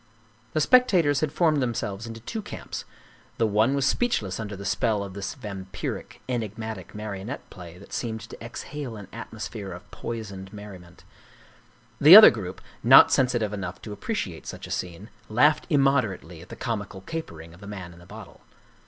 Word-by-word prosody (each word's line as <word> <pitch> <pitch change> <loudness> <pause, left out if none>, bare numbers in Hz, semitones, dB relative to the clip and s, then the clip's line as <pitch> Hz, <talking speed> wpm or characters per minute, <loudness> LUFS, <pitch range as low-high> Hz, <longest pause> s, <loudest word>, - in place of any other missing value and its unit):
The 155 - +1
spectators 180 - +4
had 155 -2 0
formed 155 -3 +2
themselves 115 -3 -3
into 115 0 -8
two 220 - -5
camps. - - -7 0.5
The 115 - +2
one 110 +5 +2
was 140 -1 +1
speechless 125 - 0
under 105 -2 -5
the 100 +1 -8
spell 105 +1 +1
of 100 -2 -8
this 100 +6 -5
vampiric, 100 -7 -6
enigmatic 110 -5 -4
marionette 105 +4 -6
play 85 -1 -11
that 100 - -14
seemed 110 -2 -3
to - - -10
exhale 125 +2 -6
an 100 - -9
atmos 110 -1 -6
phere 100 -4 -7
of 90 +3 -11
poisoned 100 -5 -6
merriment; 95 -4 -11 1.0
the 155 +6 +10
other 215 - +12
group, 95 -5 -6 0.2
not - - +8
sensi 125 -2 +3
tive 105 -3 -2
enough 95 -3 -5
to 105 - -6
appreciate 100 - -4
such - - -7
a - - -9
scene, 90 +4 -5 0.2
laughed 145 +11 +3
immoder 135 - +3
ately 85 0 -13
at 90 - -14
the - - -8
comical 100 -5 -4
capering 85 - -7
of 85 - -16
the 100 - -11
man 95 -4 -7
in 85 - -16
the 85 - -16
bottle. - - -12
110 Hz, 180 wpm, -26 LUFS, 95-130 Hz, 1.0 s, other